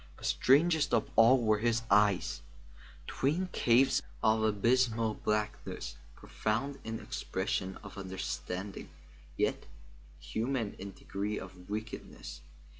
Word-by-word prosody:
But - - -10
strangest 155 +2 +4
of 110 - 0
all 120 +4 +7
were 110 -1 +3
his 115 0 +1
eyes; 100 -7 +3 0.6
twin 165 +8 0
caves 125 +3 +4 0.2
of 110 0 +4
abysmal 115 +1 +2
blackness; 105 0 -3 0.2
profound 135 +6 -2
in 115 0 -4
expression 95 +1 -3
of 100 0 -9
understanding, 95 0 -5 0.5
yet - - 0 0.5
inhuman 110 - -2
in 100 +1 -7
degree 105 +2 -4
of 90 0 -10
wickedness. 105 -7 -6
110 Hz, 110 wpm, -32 LUFS, 100-120 Hz, 0.6 s, all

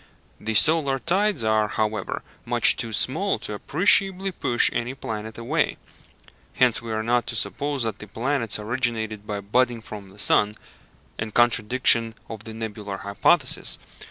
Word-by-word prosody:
The 110 +1 -3
solar 145 +1 +5
tides 185 - 0
are, 110 -1 +2
however, 105 -1 -3 0.2
much - - +5
too 115 - -4
small 165 - 0
to 105 - -7
appreciably 190 - +3
push 120 -8 +2
any 120 +2 -3
planet 110 -3 -6
away, 115 0 -1 0.8
hence 125 -3 +2
we 115 -1 -7
are 110 0 -2
not 120 +1 0
to 115 - -4
suppose 135 +6 -2
that 110 -2 -3
the 105 - -10
planets 115 +1 -1
originated 110 -2 -3
by 105 -1 -4
budding 120 +4 +1
from 105 -3 -10
the 95 - -18
sun, 105 0 +3 0.6
in 110 - -3
contradiction 115 0 +2 0.2
of 110 -2 -8
the 110 - -8
nebular 105 -3 -6
hypothesis. 130 - +1
115 Hz, 150 wpm, -24 LUFS, 105-130 Hz, 0.8 s, solar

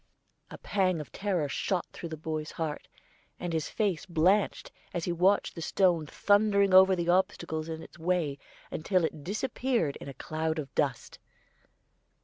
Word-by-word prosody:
A - - -9
pang 185 -4 0
of 145 -7 -8
terror 185 - -1
shot 180 +5 -1
through 170 - -7
the 160 - -6
boy's 155 0 -4
heart, 160 -2 -4 0.5
and 175 -1 -3
his 160 -2 -1
face 200 -7 -1
blanched, 185 +4 +2 0.2
as 170 - -1
he 175 - -1
watched 185 +4 +2
the 165 - -7
stone 170 -3 +2
thundering 205 +1 +3
over 190 0 +8
the 170 -1 -2
obstacles 170 -4 0
in 160 0 -5
its - - -14
way 165 -5 0 0.3
until 180 +2 +1
it 155 -2 -5
disappeared 230 - -1
in - - -9
a 135 - -9
cloud 160 +3 -2
of 140 -4 -5
dust. - - -2
170 Hz, 160 wpm, -29 LUFS, 160-190 Hz, 0.5 s, over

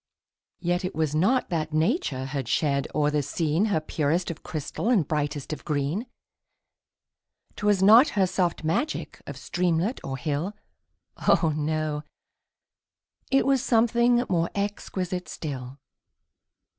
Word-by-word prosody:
Yet 175 +1 0
it 185 - -3
was 155 -2 0
not 205 +12 +2
that 155 -2 -2
nature 155 - 0
had 135 -3 -4
shed 140 +1 +1
o'er 150 -1 +2
the 150 0 +1
scene 155 +6 0
Her 205 -7 +1
purest 155 +3 -1
of 160 - -9
crystal 155 +8 -3
and 195 - +3
brightest 145 -1 -2
of - - -8
green; 150 - -1 1.5
'Twas 205 -2 +2
not 225 +9 +8
her 195 - +5
soft 180 -2 -1
magic 170 - -2
of - - -6
streamlet 180 +6 -1
or 135 -1 -4
hill, 150 +9 -2 0.6
Oh! 165 -4 +3
no, 155 0 -1 1.3
it 270 - +3
was 270 -2 +2
something 240 +1 +3
more 170 -2 +1
exquisite 190 -3 -3
still. 135 -4 -6
165 Hz, 130 wpm, -26 LUFS, 150-200 Hz, 1.5 s, not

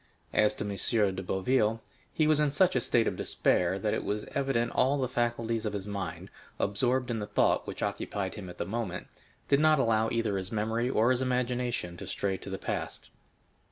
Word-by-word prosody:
As 105 0 +4
to - - -3
M. 100 0 +1
de 95 - -3
Boville, 110 +4 +1 0.3
he 155 - +1
was 155 -1 +4
in 150 -1 +3
such 160 +5 +3
a 125 - +3
state 115 -1 +2
of - - -1
despair, 90 +1 +1
that 105 +2 -1
it - - -1
was 105 +1 -2
evident 135 -4 0
all 135 +3 +3
the 130 -2 0
faculties 120 -2 -1
of 105 -2 -2
his 100 -1 -4
mind, 95 -3 -5 0.3
absorbed 125 +5 +1
in 115 - -1
the 105 - -4
thought - - +2
which - - -5
occupied 95 -2 -2
him 95 -4 -8
at 90 - -10
the - - -2
moment, 100 -2 -3 0.4
did 140 - +4
not 155 0 +5
allow 115 -3 +2
either 110 -4 0
his 95 0 -4
memory 110 +3 0
or 120 -1 +3
his 130 0 +1
imagination 125 -7 -1
to - - -8
stray 95 -1 -1
to 95 - -9
the 95 - -3
past. - - -5
115 Hz, 205 wpm, -29 LUFS, 100-125 Hz, 0.4 s, not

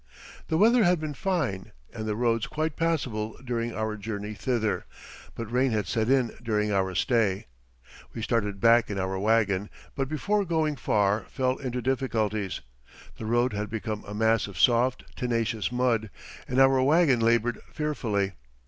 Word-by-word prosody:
The 160 - +1
weather 230 +5 +5
had 180 -2 +3
been 155 -1 -4
fine 145 - -2 0.2
and 110 -1 -5
the 105 - -1
roads 115 -1 +1
quite 155 -1 -2
passable 125 -10 -1
during 120 -1 -2
our 110 0 -2
journey 105 0 -5
thither, 115 -1 -1 0.5
but 115 -1 -6
rain 130 +2 +2
had 105 -2 0
set 110 +5 -1
in 130 -3 +2
during 105 -2 0
our 95 -2 0
stay. 105 -4 +1 0.7
We 115 - -6
started 105 -4 -1
back 115 +2 +5
in 100 - -3
our 95 0 -2
wagon, 105 -2 +2 0.2
but 135 -1 -2
before 200 +8 0
going 160 -4 0
far 105 -4 +1
fell 130 -1 0
into 125 -2 -4
difficulties. 110 -6 -1 0.6
The 110 - -6
road 120 +2 +2
had 105 0 -3
become 110 -1 -4
a 100 - -6
mass 110 0 +2
of 100 - -10
soft, 125 +1 +3
tenacious 115 -2 -1
mud 120 -3 +1 0.4
and 125 - -2
our 135 0 +5
wagon 145 -2 +4
labored 115 0 +2
fearfully. 115 -11 -1
115 Hz, 160 wpm, -27 LUFS, 105-130 Hz, 0.7 s, weather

